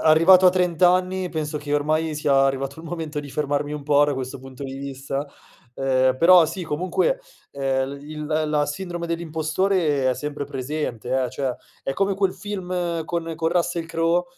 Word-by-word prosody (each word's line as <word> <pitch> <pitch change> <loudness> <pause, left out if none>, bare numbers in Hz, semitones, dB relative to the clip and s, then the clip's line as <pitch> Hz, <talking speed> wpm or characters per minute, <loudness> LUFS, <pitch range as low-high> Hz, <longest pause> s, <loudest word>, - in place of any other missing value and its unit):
arrivato 180 +4 +7
a - - +8
30 180 -3 0
anni 185 +1 +3
penso 155 -2 -3
che 145 0 -5
ormai 155 +2 +1
sia 140 -2 +3
arrivato 135 +1 -1
il - - -13
momento 160 -3 -4
di 145 -1 -10
fermarmi 145 0 -1
un 150 -1 -5
po' 145 0 +4
da 145 - 0
questo 130 -1 -5
punto 130 +1 -9
di 135 0 -6
vista, 135 +1 -4 0.5
ehm, 130 -1 +2
però 175 +2 +7
sì 180 +4 -4
comunque, 185 - 0 0.3
ehm, 135 0 -1
i 150 - -11
il 150 0 -5
l 155 0 0
la 150 -1 +2
sindrome 175 +2 -4
dell'impostore 160 -3 0
è - - 0
sempre 145 0 -4
presente 135 -3 -4 0.2
eh; 125 - -3
cioè, 130 -3 -2 0.3
è 135 - -2
come 195 +3 +1
quel 195 -1 +1
film 180 -4 -3
con 165 -1 -3
con 160 0 0
Russell 175 -1 0
Crowe 165 +2 +1
155 Hz, 185 wpm, -23 LUFS, 140-175 Hz, 0.5 s, a